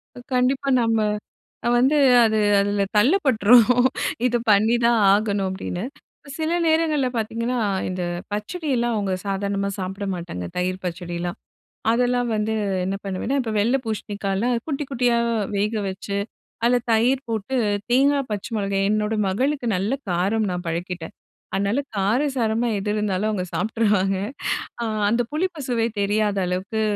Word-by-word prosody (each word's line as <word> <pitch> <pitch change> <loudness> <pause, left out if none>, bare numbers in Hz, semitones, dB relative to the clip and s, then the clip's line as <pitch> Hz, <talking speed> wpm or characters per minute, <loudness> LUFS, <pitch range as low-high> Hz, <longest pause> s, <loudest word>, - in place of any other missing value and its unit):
அ - - -9
கண்டிப்பா 260 +2 +1
நம்ம 225 -1 +2 0.7
அ - - +3
வந்து 265 +5 +3 0.3
அது 220 -1 +2 0.2
அதில 205 0 +1
தள்ளப் 300 - +4
பட்டுறோம். 240 +1 +5 0.5
"இத 245 - +1
பண்ணிதான் 230 +3 +4
ஆகணும்" 200 -2 +1
அப்படின்னு. 190 +1 -4 0.5
சில 315 0 -1 0.2
நேரங்கள்ல 315 -4 +2
பாத்தீங்கன்னா, 230 +3 -1 0.3
இந்த 185 0 -3 0.3
பச்சடியெல்லாம் 240 - -1
அவுங்க 200 -2 -1
சாதாரணமா 200 0 -1
சாப்பிட 190 +2 -4
மாட்டாங்க. 170 - -5
தயிர் 185 +1 -2
பச்சடிலாம். 175 0 -4 0.5
அதெல்லாம் 245 +1 +1
வந்து 215 +1 -1 0.3
என்ன 195 +1 -2
பண்ணுவேன்னா, 195 +8 -2
இப்போ 225 -3 -3
வெள்ளை 240 +6 +2
பூசணிக்காய்லாம் 210 +1 -2
குட்டி 295 -2 -2
குட்டியா 245 -2 +2 0.4
வேக 210 +3 0
வச்சு, 195 +1 -5 0.5
அதில 245 +1 +4
தயிர் 250 +5 +2
போட்டு, 225 +3 -2 0.3
தேங்காய் 275 +1 +3
பச்சை 205 +1 -4
மொளகாய் 195 -1 0
என்னோட 215 +1 0
மகளுக்கு 260 +7 0
நல்ல 200 +6 -1 0.2
காரம் 195 +5 +1
நான் 180 0 -4
பழக்கிட்டேன். 170 0 -4 0.4
அதனால 200 +7 +1 0.2
காரசாரமா 230 +2 +1
எது 205 +1 -2
இருந்தாலும் 210 -1 0
அவுங்க 195 -4 -2
சாப்ட்டுருவாங்க. 205 0 +1 0.7
அ - - 0 0.2
அந்த 235 +3 +2
புளிப்பு 340 +1 -2
சுவை 230 -2 +1
தெரியாத 205 0 +1
அளவுக்கு, 190 +5 -2
215 Hz, 130 wpm, -23 LUFS, 195-245 Hz, 0.7 s, பட்டுறோம்